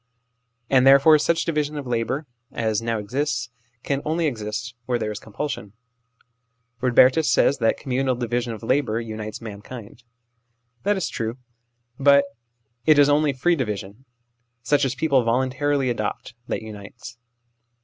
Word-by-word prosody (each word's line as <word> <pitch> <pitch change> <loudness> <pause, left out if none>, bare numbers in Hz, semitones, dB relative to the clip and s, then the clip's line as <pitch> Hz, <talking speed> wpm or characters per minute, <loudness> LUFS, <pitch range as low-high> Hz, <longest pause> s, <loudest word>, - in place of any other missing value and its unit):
And 130 0 +4
therefore 140 +3 +7
such 165 +2 +1
division 150 -2 -1
of 145 - -5
labour 125 +4 -2 0.3
as 110 -1 -1
now 115 0 -1
exists, 120 +2 -2 0.3
can 140 -1 -1
only 160 +2 0
exist 115 -2 -3
where 125 -1 +1
there 110 -2 -3
is 105 - -6
compulsion. 110 -3 -5 1.1
Eodbertus 130 +1 +5
l - - +4
says 140 - +3
that 115 -2 +2
communal 130 -1 -1
division 120 0 -2
of 110 -1 -8
labour 125 -2 +1
unites 110 -1 -6
mankind. 110 +2 -9 0.8
That 205 +6 +1
is 190 - -1
true; 115 +2 -4 0.6
but 140 0 +5 0.6
it 155 +3 +5
is 145 0 +6
only 145 0 +3
free 170 +7 +1
division 105 -2 -5 0.6
such 145 +2 +2
as 130 -1 -2
people 135 -2 +2
voluntarily 130 +3 +1
adopt 110 +1 -4
that - - -3
unites. 110 +2 -10
125 Hz, 140 wpm, -23 LUFS, 115-145 Hz, 1.1 s, therefore